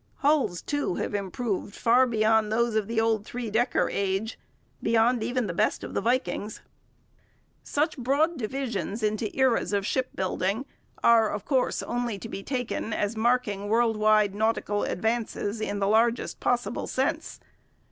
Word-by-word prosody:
Hulls, 285 Hz, -, +2 dB
too, 290 Hz, -11 st, -1 dB
have -, -, -3 dB
improved 200 Hz, +1 st, -3 dB
far 245 Hz, +3 st, +4 dB
beyond 220 Hz, -1 st, +2 dB
those 235 Hz, +1 st, +1 dB
of 215 Hz, -2 st, 0 dB
the 230 Hz, 0 st, 0 dB
old 225 Hz, -2 st, +1 dB
three 235 Hz, -1 st, -5 dB
decker 240 Hz, +4 st, +2 dB
age, 200 Hz, +3 st, -2 dB, 0.4 s
beyond 230 Hz, +1 st, +3 dB
even 245 Hz, +1 st, -1 dB
the 180 Hz, -, -3 dB
best 210 Hz, +5 st, 0 dB
of -, -, -7 dB
the -, -, 0 dB
Vikings'. 235 Hz, -3 st, -1 dB, 1.0 s
Such 300 Hz, 0 st, -1 dB
broad 285 Hz, +7 st, +2 dB
divisions 230 Hz, -, -3 dB
into 215 Hz, 0 st, 0 dB
eras 260 Hz, -5 st, +2 dB
of 200 Hz, -1 st, +1 dB
shipbuilding 205 Hz, -1 st, -1 dB, 0.4 s
are, 225 Hz, -2 st, +5 dB
of 205 Hz, -1 st, -4 dB
course, 260 Hz, -3 st, +1 dB
only 240 Hz, -3 st, -2 dB
to 225 Hz, -, -8 dB
be 195 Hz, -, -5 dB
taken 245 Hz, -2 st, -3 dB
as 210 Hz, +2 st, -1 dB
marking 220 Hz, -3 st, 0 dB
world 225 Hz, 0 st, +3 dB
wide 215 Hz, -1 st, +3 dB
nautical 210 Hz, -1 st, 0 dB
advances 220 Hz, 0 st, -2 dB
in 205 Hz, -1 st, -2 dB
the 195 Hz, -1 st, 0 dB
largest 230 Hz, +3 st, +2 dB
possible 245 Hz, 0 st, -1 dB
sense. 265 Hz, +2 st, -2 dB
225 Hz, 150 wpm, -27 LUFS, 210-245 Hz, 1.0 s, are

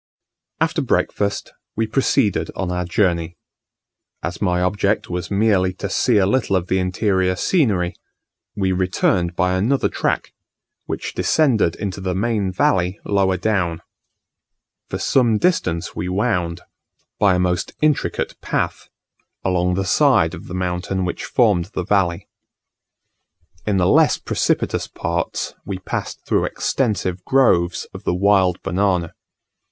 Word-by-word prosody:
After -, -, +1 dB
breakfast 100 Hz, -1 st, -1 dB, 0.2 s
we 110 Hz, -, +1 dB
proceeded 115 Hz, -2 st, +1 dB
on 95 Hz, -2 st, -2 dB
our 90 Hz, 0 st, -2 dB
Journey. 85 Hz, -2 st, 0 dB, 0.9 s
As 85 Hz, +1 st, -4 dB
my 90 Hz, -3 st, +1 dB
object 100 Hz, +2 st, 0 dB
was 90 Hz, -1 st, -3 dB
merely 100 Hz, -3 st, +2 dB
to 95 Hz, +1 st, -5 dB
see 120 Hz, +3 st, +2 dB
a 95 Hz, -, +4 dB
little 105 Hz, -1 st, +1 dB
of 90 Hz, -1 st, -1 dB
the 95 Hz, -, +2 dB
interior 95 Hz, 0 st, +1 dB
scenery, 100 Hz, -, +1 dB, 0.6 s
we 95 Hz, -2 st, 0 dB
returned 90 Hz, -1 st, +1 dB
by 90 Hz, +1 st, +1 dB
another 115 Hz, +9 st, +1 dB
track, -, -, -2 dB, 0.5 s
which -, -, -4 dB
descended 120 Hz, -, +2 dB
into 100 Hz, -1 st, -5 dB
the 95 Hz, -1 st, -2 dB
main 105 Hz, -2 st, 0 dB
valley 90 Hz, +1 st, +1 dB
lower 95 Hz, -2 st, +2 dB
down. 90 Hz, -4 st, -1 dB, 1.1 s
For -, -, -3 dB
some 120 Hz, -5 st, +2 dB
distance 90 Hz, -, 0 dB
we 90 Hz, -, -3 dB
wound, 90 Hz, -4 st, -1 dB, 0.6 s
by 100 Hz, -3 st, +4 dB
a -, -, +1 dB
most 90 Hz, -1 st, -1 dB
intricate 150 Hz, -2 st, 0 dB
path, -, -, -2 dB, 0.6 s
along 90 Hz, -1 st, +1 dB
the 95 Hz, +1 st, -1 dB
side 100 Hz, -, +3 dB
of -, -, -9 dB
the 90 Hz, -, -6 dB
mountain 90 Hz, +1 st, -2 dB
which 90 Hz, -, -4 dB
formed 105 Hz, -9 st, +2 dB
the 90 Hz, -, -2 dB
valley. 95 Hz, -4 st, +1 dB, 1.4 s
In 100 Hz, -2 st, +2 dB
the 90 Hz, -, +2 dB
less -, -, +4 dB
precipitous -, -, -1 dB
parts -, -, -3 dB
we 100 Hz, -1 st, -4 dB
passed 95 Hz, -, -5 dB
through -, -, +1 dB
extensive 95 Hz, -8 st, -1 dB
groves 95 Hz, -11 st, +2 dB
of -, -, -9 dB
the -, -, 0 dB
wild 95 Hz, -2 st, +3 dB
banana. 90 Hz, -2 st, 0 dB
95 Hz, 135 wpm, -20 LUFS, 90-105 Hz, 1.4 s, a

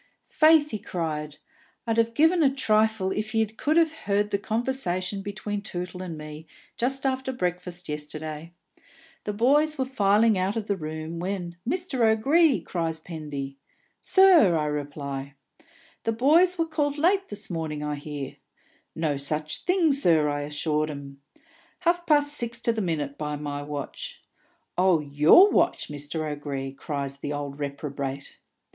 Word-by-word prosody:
"Faith," 310 Hz, -1 st, +4 dB
he 215 Hz, -, -3 dB
cried, 155 Hz, -6 st, -4 dB, 0.5 s
"I'd 225 Hz, -1 st, 0 dB
have 230 Hz, 0 st, +2 dB
given 325 Hz, +3 st, +4 dB
a 285 Hz, -, +5 dB
trifle 220 Hz, -6 st, +2 dB
if 215 Hz, +3 st, -3 dB
ye 220 Hz, 0 st, +4 dB
could 260 Hz, +9 st, -1 dB
have 325 Hz, -2 st, +4 dB
heard 205 Hz, -7 st, -1 dB
the 200 Hz, -, +1 dB
conversation 205 Hz, -5 st, -1 dB
between 205 Hz, +1 st, -4 dB
Tootle 180 Hz, -3 st, -6 dB
and 175 Hz, -4 st, -6 dB
me, 155 Hz, +1 st, -9 dB, 0.3 s
just 270 Hz, +3 st, -1 dB
after 265 Hz, 0 st, 0 dB
breakfast 180 Hz, -5 st, -4 dB
yesterday. 155 Hz, +2 st, -5 dB, 0.7 s
The 210 Hz, -, -2 dB
boys 295 Hz, +8 st, +3 dB
were 260 Hz, -, 0 dB
filing 215 Hz, -3 st, +3 dB
out 190 Hz, +3 st, 0 dB
of 225 Hz, -2 st, -2 dB
the 205 Hz, -, 0 dB
room, 160 Hz, 0 st, -5 dB
when, 180 Hz, -1 st, -4 dB
'Mr. 350 Hz, -5 st, -2 dB
O'Gree!' 270 Hz, +8 st, +4 dB
cries 165 Hz, -2 st, -3 dB
Pendy. 145 Hz, -5 st, -6 dB, 0.4 s
'Sir!' 360 Hz, -, +6 dB
I 150 Hz, -, 0 dB
reply. 140 Hz, -2 st, -4 dB, 0.7 s
'The 225 Hz, -, -1 dB
boys 325 Hz, +10 st, +4 dB
were 330 Hz, -, +1 dB
called 295 Hz, -2 st, -1 dB
late 380 Hz, +5 st, +2 dB
this 205 Hz, -1 st, -5 dB
morning, 155 Hz, -3 st, -3 dB
I 150 Hz, 0 st, -2 dB
hear.' 145 Hz, -1 st, -6 dB, 0.6 s
'No 155 Hz, -3 st, 0 dB
such 150 Hz, +2 st, -2 dB
thing, 360 Hz, -4 st, +3 dB
sir,' 165 Hz, -, +3 dB
I 145 Hz, 0 st, -2 dB
assure 150 Hz, +1 st, -1 dB
'um. 140 Hz, -1 st, -9 dB, 0.6 s
'Half 345 Hz, 0 st, +1 dB
past 290 Hz, -1 st, +4 dB
six 235 Hz, -3 st, -2 dB
to 235 Hz, -, +2 dB
the 220 Hz, -, -2 dB
minute, 150 Hz, -6 st, -2 dB
by 150 Hz, -1 st, -2 dB
my 145 Hz, -1 st, -4 dB
watch.' 150 Hz, -, -6 dB, 0.6 s
'Oh, 185 Hz, -3 st, +4 dB
your 150 Hz, -, +6 dB
watch, -, -, +1 dB
Mr. 150 Hz, +2 st, -4 dB
O'Gree,' 140 Hz, -2 st, -4 dB
cries 140 Hz, -1 st, -5 dB
the 145 Hz, +1 st, -4 dB
old 145 Hz, -1 st, -5 dB
reprobate. 140 Hz, -1 st, -5 dB
180 Hz, 150 wpm, -26 LUFS, -, 0.7 s, Sir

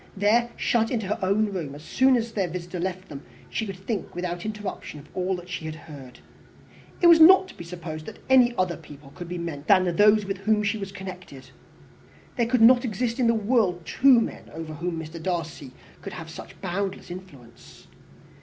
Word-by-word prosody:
There, 225 Hz, +4 st, +3 dB
shut 225 Hz, -2 st, +1 dB
into 225 Hz, -5 st, -2 dB
her 205 Hz, +3 st, -2 dB
own 200 Hz, +2 st, +1 dB
room, 155 Hz, -7 st, -4 dB
as 150 Hz, -, -11 dB
soon 260 Hz, +9 st, +3 dB
as 230 Hz, 0 st, -3 dB
their 195 Hz, -5 st, -1 dB
visitor 175 Hz, +1 st, -6 dB
left 185 Hz, +1 st, -4 dB
them, 140 Hz, -2 st, -8 dB, 0.3 s
she 220 Hz, -, -2 dB
could 195 Hz, -, -5 dB
think 195 Hz, 0 st, -5 dB
without 175 Hz, +2 st, -4 dB
interruption 210 Hz, -7 st, -6 dB
of 140 Hz, -, -15 dB
all 185 Hz, +1 st, 0 dB
that 175 Hz, 0 st, -9 dB
she 165 Hz, -, -5 dB
had 155 Hz, 0 st, -5 dB
heard. 140 Hz, -6 st, -12 dB, 0.8 s
It -, -, +3 dB
was 335 Hz, -1 st, +8 dB
not 375 Hz, +3 st, +8 dB
to -, -, -13 dB
be -, -, -9 dB
supposed 165 Hz, -2 st, -7 dB
that -, -, -8 dB
any 250 Hz, -2 st, +5 dB
other 185 Hz, -2 st, 0 dB
people 145 Hz, -3 st, -14 dB
could 175 Hz, -1 st, -8 dB
be 180 Hz, -, -4 dB
meant 160 Hz, -4 st, -6 dB
than 185 Hz, -3 st, +4 dB
those 210 Hz, 0 st, +5 dB
with 195 Hz, -1 st, -4 dB
whom 210 Hz, +1 st, +1 dB
she 210 Hz, +1 st, -1 dB
was 195 Hz, -1 st, -6 dB
connected. 180 Hz, -8 st, -10 dB, 0.8 s
There 235 Hz, -3 st, +1 dB
could 250 Hz, 0 st, +1 dB
not 245 Hz, +2 st, +7 dB
exist 235 Hz, +1 st, -2 dB
in 245 Hz, -, +3 dB
the 230 Hz, -, +3 dB
world 205 Hz, -6 st, +1 dB
two 260 Hz, +4 st, +5 dB
men 230 Hz, -, -5 dB
over 160 Hz, 0 st, -7 dB
whom 170 Hz, +2 st, -3 dB
Mr. 160 Hz, +1 st, -8 dB
Darcy 165 Hz, -6 st, -4 dB, 0.3 s
could 195 Hz, -, -7 dB
have 165 Hz, -2 st, -8 dB
such -, -, -11 dB
boundless 190 Hz, 0 st, -3 dB
influence. 140 Hz, -11 st, -12 dB
185 Hz, 200 wpm, -25 LUFS, 165-220 Hz, 0.8 s, was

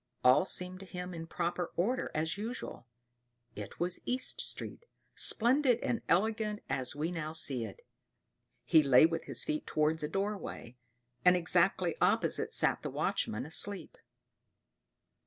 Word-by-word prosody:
All 125 Hz, +8 st, +6 dB
seemed 185 Hz, -1 st, 0 dB
to 195 Hz, -, -11 dB
him 180 Hz, -1 st, -6 dB
in 165 Hz, -1 st, -7 dB
proper 175 Hz, +1 st, -2 dB
order 235 Hz, +9 st, 0 dB
as 160 Hz, +1 st, 0 dB
usual; 220 Hz, -, -6 dB, 0.7 s
it 105 Hz, -1 st, -8 dB
was 175 Hz, +1 st, -1 dB
East 255 Hz, +1 st, 0 dB
Street, 470 Hz, -, -3 dB, 0.3 s
splendid 250 Hz, +1 st, +3 dB
and 235 Hz, -, -1 dB
elegant 210 Hz, +4 st, +1 dB
as 130 Hz, +1 st, -2 dB
we 155 Hz, +4 st, -2 dB
now 155 Hz, -2 st, -4 dB
see 135 Hz, -7 st, +2 dB
it. 100 Hz, -, -11 dB, 0.8 s
He 160 Hz, -, +6 dB
lay 135 Hz, 0 st, +6 dB
with 165 Hz, 0 st, -1 dB
his -, -, -1 dB
feet 150 Hz, -, -3 dB
towards 155 Hz, +1 st, +1 dB
a 150 Hz, -, -2 dB
doorway, 195 Hz, -, -4 dB, 0.5 s
and 180 Hz, 0 st, +6 dB
exactly 175 Hz, 0 st, +1 dB
opposite -, -, +1 dB
sat -, -, +1 dB
the -, -, -4 dB
watchman 110 Hz, +4 st, -2 dB
asleep. 180 Hz, +2 st, -2 dB
175 Hz, 140 wpm, -32 LUFS, 155-200 Hz, 0.8 s, All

